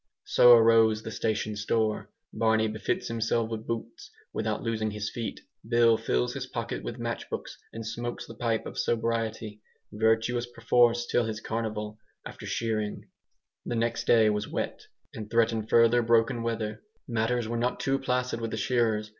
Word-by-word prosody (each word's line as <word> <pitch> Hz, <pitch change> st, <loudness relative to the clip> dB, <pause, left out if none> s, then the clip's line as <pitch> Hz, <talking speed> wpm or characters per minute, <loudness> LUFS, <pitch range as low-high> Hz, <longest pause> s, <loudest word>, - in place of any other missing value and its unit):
So 120 Hz, 0 st, +7 dB
arose 115 Hz, -1 st, +5 dB
the 110 Hz, -, -6 dB
station 110 Hz, 0 st, -1 dB
store. 110 Hz, +1 st, -1 dB, 0.2 s
Barney 110 Hz, -1 st, +2 dB
befits 110 Hz, 0 st, -2 dB
himself 115 Hz, 0 st, -1 dB
with 110 Hz, -1 st, -5 dB
boots 115 Hz, 0 st, -5 dB, 0.2 s
without -, -, -2 dB
losing 110 Hz, -1 st, -1 dB
his 105 Hz, 0 st, -4 dB
feet; 115 Hz, -2 st, -5 dB, 0.3 s
Bill 115 Hz, -1 st, +5 dB
fills 120 Hz, +2 st, 0 dB
his 130 Hz, -1 st, -5 dB
pocket 115 Hz, -2 st, -4 dB
with 115 Hz, -, -5 dB
match 115 Hz, -1 st, -4 dB
boxes -, -, -6 dB
and 115 Hz, 0 st, -7 dB
smokes 120 Hz, +2 st, -4 dB
the -, -, -10 dB
pipe 115 Hz, -1 st, -1 dB
of -, -, -6 dB
sobriety, 115 Hz, -2 st, -1 dB, 0.3 s
virtuous 110 Hz, +3 st, +1 dB
perforce 120 Hz, 0 st, +2 dB
till 120 Hz, 0 st, +1 dB
his 110 Hz, -1 st, -4 dB
carnival, 110 Hz, -1 st, -4 dB, 0.3 s
after -, -, -8 dB
shearing. 110 Hz, -2 st, -2 dB, 0.5 s
The 120 Hz, -, -3 dB
next 115 Hz, 0 st, -1 dB
day 110 Hz, -2 st, +5 dB
was 105 Hz, 0 st, -2 dB
wet, -, -, -4 dB, 0.3 s
and 105 Hz, -1 st, -7 dB
threatened 115 Hz, -1 st, +1 dB
further 115 Hz, +1 st, +5 dB
broken 115 Hz, +1 st, +2 dB
weather. 110 Hz, -2 st, -3 dB, 0.3 s
Matters 115 Hz, 0 st, 0 dB
were 120 Hz, -, -3 dB
not 120 Hz, +2 st, -1 dB
too 135 Hz, 0 st, 0 dB
placid 125 Hz, -2 st, -1 dB
with 115 Hz, -, -2 dB
the -, -, -4 dB
shearers. 110 Hz, -4 st, +1 dB
115 Hz, 165 wpm, -28 LUFS, 110-120 Hz, 0.5 s, So